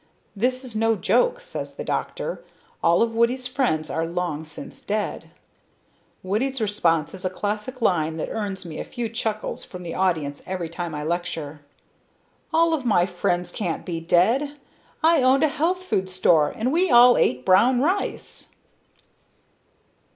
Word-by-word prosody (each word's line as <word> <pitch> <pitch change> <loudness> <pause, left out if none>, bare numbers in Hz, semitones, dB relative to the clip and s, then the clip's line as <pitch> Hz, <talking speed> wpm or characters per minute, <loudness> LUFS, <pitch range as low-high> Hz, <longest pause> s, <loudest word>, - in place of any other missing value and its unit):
This 255 +5 0
is 245 -4 -7
no 225 +1 +2
joke, - - +2
says - - -6
the - - -5
doctor, - - -3 0.4
all 170 +6 +4
of 230 -1 -1
Woody's 235 +3 +1
friends 245 - 0
are 165 0 -1
long 170 -3 -3
since 265 - -10
dead. 210 0 -3 0.9
Woody's 250 +8 -1
response 175 -8 +1
is 190 0 -9
a 185 - 0
classic 210 +6 -4
line 160 -5 +1
that 155 - -3
earns 200 -4 -4
me 160 -2 -7
a - - -3
few 235 -2 -4
chuckles 220 -1 -3
from 180 -1 -9
the 165 -1 -5
audience 160 -7 0
every 180 -3 -3
time 170 -1 -5
I 150 - -4
lecture: 160 -3 -3 0.9
'all 330 0 +3
my 215 -9 +2
friends 175 -1 -1
can't 175 -6 -3
be 170 -3 -3
dead! 235 - +2 0.5
I 325 -2 +5
owned 260 +2 +4
a - - +6
health 335 +5 0
food 190 - -1
store 175 -5 +3
and 240 +4 -2
we 360 +2 +2
all 240 +1 +8
ate 125 0 +1
brown 240 +7 +5
rice.' 360 +9 -2
205 Hz, 155 wpm, -24 LUFS, 175-255 Hz, 0.9 s, all